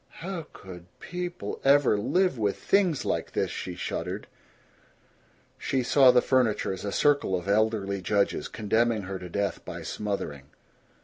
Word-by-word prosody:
"How 180 -5 -5
could 90 -2 -11
people 180 0 -5
ever 140 -4 +5
live 180 - +1
with 100 -2 0
things 185 -7 +1
like - - -2
this?" - - 0
she 90 - -5
shuddered. - - -4 1.3
She 130 -1 0
saw 130 +1 +6
the 125 0 +5
furniture 125 -7 +1
as 95 - -7
a 100 - -3
circle 145 -6 +2
of 90 +1 -4
elderly 100 -2 +1
judges, 100 +2 0
condemning 110 0 0
her 95 0 -5
to 90 - -8
death 100 +2 -2
by - - -7
smothering. 90 -10 -4
110 Hz, 145 wpm, -27 LUFS, 100-140 Hz, 1.3 s, saw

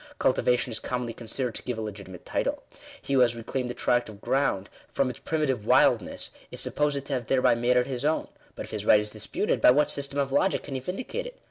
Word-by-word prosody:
Cultivation 125 -1 +2
is 110 - -3
commonly 125 -2 -3
considered 120 +2 -4
to - - -6
give 125 -2 -4
a - - -3
legitimate 100 -4 -8
title. - - -1 0.4
He 140 - -4
who 135 - +4
has 120 -2 +4
reclaimed 125 +2 -3
a 120 - -4
tract 120 -1 +1
of 105 -2 -11
ground 110 -7 0 0.2
from 130 -2 +1
its 120 - -12
primitive 135 -8 -1
wildness, - - +3 0.2
is - - -5
supposed 145 -2 0
to 140 - -4
have 125 -4 -2
thereby 130 -1 +4
made 120 +2 +2
it 125 - +3
his 130 -1 -4
own. 155 +2 +1 0.3
But - - -5
if - - -11
his 105 -2 -3
right 105 - +6
is 105 0 -3
disputed, 110 - -2
by - - +8
what 145 +4 +4
system 140 0 -2
of 140 -1 0
logic 165 +8 +2
can 145 - -7
he 130 - -1
vindicate 255 - -4
it? - - -12
125 Hz, 235 wpm, -27 LUFS, 115-140 Hz, 0.4 s, by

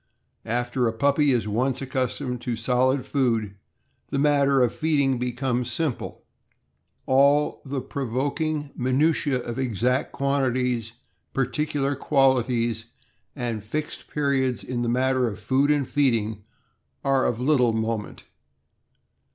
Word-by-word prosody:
After 120 +2 0
a 115 - -1
puppy 140 +4 +2
is 120 -4 +1
once 125 +5 0
accustomed 130 -1 -3
to 120 -2 -2
solid 125 +3 +1
food, 115 -7 0 0.6
the - - -2
matter 140 -2 +3
of 120 - +1
feed 155 -2 0
ing 135 -3 +2
becomes 125 0 -1
simple. 150 -1 -3 0.8
All 140 +3 +3
the 135 -1 -3
provoking 140 +4 -2
minutiae 135 0 +1
of 120 +2 -5
exact 125 +2 0
quantities, 125 -4 0 0.4
particular 140 +2 -1
qualities, 125 -5 +1 0.5
and 120 -6 -3
fixed 150 +8 -5
periods 135 -4 0
in 125 -1 -3
the 120 - 0
matter 130 +1 +2
of 105 - -5
food 130 +7 +1
and 145 -3 +2
feeding 110 -7 0 0.6
are 135 -1 +3
of 115 - -1
little 125 -3 +3
moment. 110 -1 -3
130 Hz, 120 wpm, -25 LUFS, 120-140 Hz, 0.8 s, matter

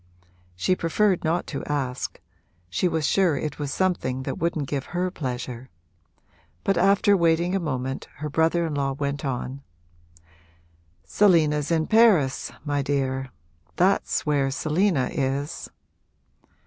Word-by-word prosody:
She 185 - +1
preferred 185 +3 +1
not 165 +2 0
to 140 - -5
ask 135 -3 -3 0.5
she 180 - +1
was 160 -3 0
sure 175 -2 +3
it 150 +2 -4
was 145 -1 -3
something 145 -9 -1
that - - -4
wouldn't 160 -4 -1
give 140 -1 -3
her 180 0 0
pleasure; 125 -4 -5 0.9
but 195 - +2
after 200 +3 +4
waiting 170 +1 +2
a - - +1
moment 135 -5 -3
her 150 - -5
brother 160 +3 +2
in 160 - -3
law 140 -1 0
went 140 0 -3
on: 135 0 -3 1.4
'Selina's 155 - +3
in 160 -2 +2
Paris, 205 - +3
my 145 -1 0
dear; 135 -1 -1 0.5
that's 190 +3 +1
where 145 -3 +1
Selina 155 +1 +1
is!' 140 0 -2
150 Hz, 130 wpm, -25 LUFS, 135-175 Hz, 1.4 s, after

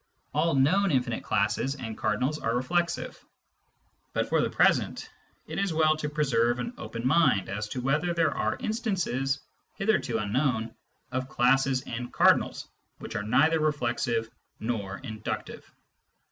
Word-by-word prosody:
All 155 +1 +2
known 185 +9 +3
infinite 125 -6 0
classes 110 +6 0
and 115 -5 -6
cardinals 130 +10 0
are 115 +1 -1
reflexive; 170 +7 -1 0.9
but - - 0
for - - +2
the - - 0
present - - +2 0.4
it - - -4
is 195 -5 0
well 155 -1 +4
to 150 -1 -3
preserve 120 -6 +1
an 235 - -4
open 115 +1 -6
mind 135 - +3
as 105 +2 -3
to 125 +4 -4
whether 150 +7 +1
there 165 -3 +1
are - - 0
instances, 185 - -1 0.3
hitherto 195 - +1
unknown, 115 +1 0 0.4
of 130 +1 -3
classes 135 +1 +2
and 120 +1 -5
cardinals - - +3 0.3
which - - -8
are 105 - 0
neither 145 +10 +3
reflexive 120 -6 0 0.3
nor 105 -4 -3
inductive. 110 -4 -6
135 Hz, 140 wpm, -28 LUFS, 115-155 Hz, 0.9 s, well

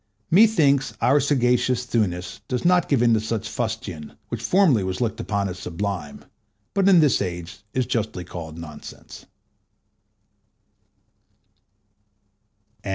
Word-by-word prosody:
Methinks 160 -9 +4
our 140 +3 +4
sagacious 125 -3 +1
Thuanus 90 -7 -2
does 125 +2 -3
not 180 0 +3
give 130 -5 +3
in 120 -1 +4
to 110 - +3
such 110 0 -3
fustian, 110 -9 -5
which - - -4
formerly 175 - +3
was 95 +2 -3
looked 115 -2 -2
upon 100 -3 -1
as 90 -1 -6
sublime, 90 -3 -5 0.5
but 195 -1 +3
in 180 -4 +7
this 150 -3 +3
age 90 -2 -5 0.2
is 130 -1 +1
justly 110 -6 -2
called 80 -2 -8
nonsense. 75 -3 -11
115 Hz, 120 wpm, -23 LUFS, 90-135 Hz, 0.5 s, in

